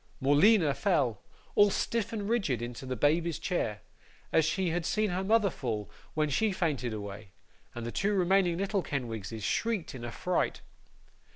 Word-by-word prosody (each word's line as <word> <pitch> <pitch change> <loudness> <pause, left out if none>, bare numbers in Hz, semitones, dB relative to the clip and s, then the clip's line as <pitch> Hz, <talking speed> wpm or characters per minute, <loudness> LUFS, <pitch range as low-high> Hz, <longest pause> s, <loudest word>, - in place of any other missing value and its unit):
Morleena 150 +4 +5
fell, 135 - +1 0.3
all 205 0 +6
stiff 225 +2 -1
and 210 -3 -3
rigid, 200 - +1
into 120 +2 -6
the 130 - -2
baby's 160 +5 +2
chair, 110 - -2 0.5
as 160 - +4
she 170 +3 0
had 175 +1 -1
seen 210 +4 0
her 185 +2 -1
mother 210 -1 +3
fall 105 - -4 0.2
when 155 0 +2
she 205 +10 +1
fainted 150 -10 -1
away, 100 -1 -7 0.4
and 120 -1 -5
the 120 - -3
two 200 +8 0
remaining 185 -2 +3
little 195 +1 0
Kenwigses 115 - -4
shrieked 225 - -1
in 125 -3 -8
affright. 170 +10 -1
160 Hz, 160 wpm, -30 LUFS, 120-195 Hz, 0.5 s, all